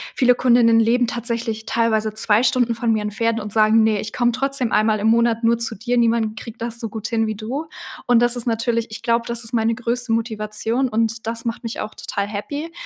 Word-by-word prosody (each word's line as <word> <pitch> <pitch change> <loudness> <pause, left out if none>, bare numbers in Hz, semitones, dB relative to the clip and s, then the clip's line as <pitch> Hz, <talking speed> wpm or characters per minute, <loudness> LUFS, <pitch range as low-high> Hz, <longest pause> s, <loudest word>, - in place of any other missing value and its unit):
viele 250 -1 +4
Kundinnen 235 -2 +4
leben 235 +2 +3
tatsächlich 230 -2 -3
teilweise 220 -2 +1
2 215 0 +2
Stunden 245 -2 +2
von 230 0 -1
mir 215 -1 +1
entfernt 225 +2 -1
und 210 -1 -6
sagen: 220 0 +4
„Ne, 215 -1 +2
ich 215 - -7
komme 240 -1 +2
trotzdem 270 -1 -1
einmal 215 0 +2
im 210 - 0
Monat 230 0 +2
nur 230 +1 +3
zu 230 -1 -3
dir, 240 +4 -2
niemand 225 -2 +1
kriegt 230 -1 -10
das 235 0 -4
so 230 - -4
gut 220 +1 -5
hin 225 -1 0
wie 215 - -3
du.“ 245 +9 -4 0.4
Und 245 -1 +5
das 240 0 +4
ist 245 - -3
natürlich 230 0 0
ich 220 - -9
glaube, 235 0 +1
das 235 0 -2
ist 225 +2 -9
meine 225 0 +1
größte 240 0 -3
Motivation 225 +2 -1
und 225 0 -1
das 230 0 -3
macht 230 0 -3
mich 230 -1 -5
auch 215 - -6
total 200 - -4
happy. 285 +10 -5
230 Hz, 225 wpm, -21 LUFS, 220-240 Hz, 0.4 s, Und